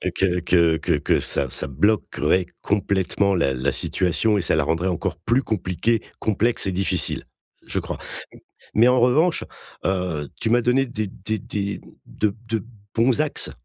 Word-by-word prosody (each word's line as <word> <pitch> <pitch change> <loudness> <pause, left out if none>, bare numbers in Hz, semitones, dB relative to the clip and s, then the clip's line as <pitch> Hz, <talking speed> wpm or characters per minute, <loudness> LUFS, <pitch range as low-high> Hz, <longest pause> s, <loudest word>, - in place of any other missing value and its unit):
que 90 -2 +1
que 85 -2 +3
que - - 0
que - - +1
ça 70 - +1
ça - - +1
bloquerait 90 - +1 0.2
complètement 100 -1 +1
la 75 -6 +1
la 65 +2 -1
situation 95 +4 +1
et - - +1
ça 85 - +1
la 80 - +2
rendrait 80 +5 0
encore 90 - -2
plus 120 +4 +1
compliquée, 110 +2 0 0.2
complexe 110 +1 +1
et - - 0
difficile, 95 -1 +1 0.4
je - - -2
crois. - - -5 0.6
M 110 - -4
mais 120 - +7
en 125 0 +4
revanche, 150 +8 +3 0.4
heu, 90 -6 -1
tu 110 - +1
m'as 120 +2 +4
donné 125 +3 +2
des 110 -4 -3
des 105 +3 -4
des 100 +1 -4 0.2
de 105 -2 -1
de 110 -1 -2 0.3
bons 120 +5 +3
axes 155 - 0
100 Hz, 165 wpm, -22 LUFS, 90-115 Hz, 0.6 s, mais